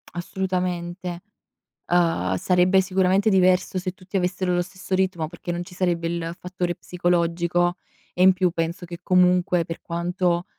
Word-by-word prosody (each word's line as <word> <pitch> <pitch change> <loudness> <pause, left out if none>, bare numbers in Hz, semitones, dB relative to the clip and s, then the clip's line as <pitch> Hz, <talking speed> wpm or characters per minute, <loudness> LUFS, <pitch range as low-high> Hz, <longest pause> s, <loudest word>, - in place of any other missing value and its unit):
Assolutamente. 180 -1 -3 0.7
Uhm, 165 - +2
sarebbe 180 - +3
sicuramente 190 +2 +2
diverso 185 -1 +3
se 185 0 -2
tutti 190 0 -5
avessero 180 0 0
lo 175 - +2
stesso 185 +1 -7
ritmo 185 -4 0
perché 170 +1 -6
non 175 0 -3
ci 180 +1 -14
sarebbe 175 -2 0
il 170 0 -3
fattore 180 -1 -3
psicologico 175 0 0 0.4
e 180 - +2
in 190 0 +7
più 185 -1 +1
penso 165 +1 -3
che 170 0 -8
comunque, 180 -1 +3
per 165 0 -7
quanto 175 +1 -1
180 Hz, 145 wpm, -23 LUFS, 170-185 Hz, 0.7 s, in